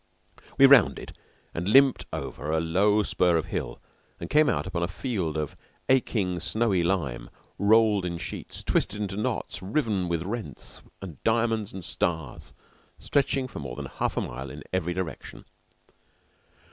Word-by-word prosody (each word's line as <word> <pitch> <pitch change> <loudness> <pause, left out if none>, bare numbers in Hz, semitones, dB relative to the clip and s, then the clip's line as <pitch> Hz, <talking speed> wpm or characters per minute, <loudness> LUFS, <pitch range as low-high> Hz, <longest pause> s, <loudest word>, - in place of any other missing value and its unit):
We 135 - +8
rounded 135 -5 +5 0.4
and 85 +2 -3
limped 135 +4 +5
over 75 - -5
a 80 - +2
low 100 +6 +3
spur 90 -4 +2
of 80 - -1
hill, - - -3 0.4
and 85 - -7
came 150 -1 +5
out 75 - 0
upon 85 - -3
a 85 - +1
field 90 - -3
of 75 -2 -3 0.3
aching, 105 -9 +2
snowy 95 +2 +1
lime 80 -10 -1 0.3
rolled 105 -1 +4
in 85 -1 -3
sheets, 85 - -6
twisted 105 - 0
into 100 -2 -3
knots, 105 -2 -3
riven 100 - 0
with 85 -1 -1
rents, 100 - -6 0.2
and 85 -8 -9
diamonds, 115 -2 +1
and 95 -1 -7
stars, 80 -7 -2 0.5
stretching 135 -2 0
for - - -8
more 70 -4 -6
than - - -5
half - - -3
a - - +2
mile 65 +3 -6
in - - -9
every 90 -1 -1
direction. 95 -3 -6
95 Hz, 155 wpm, -27 LUFS, 85-110 Hz, 0.5 s, We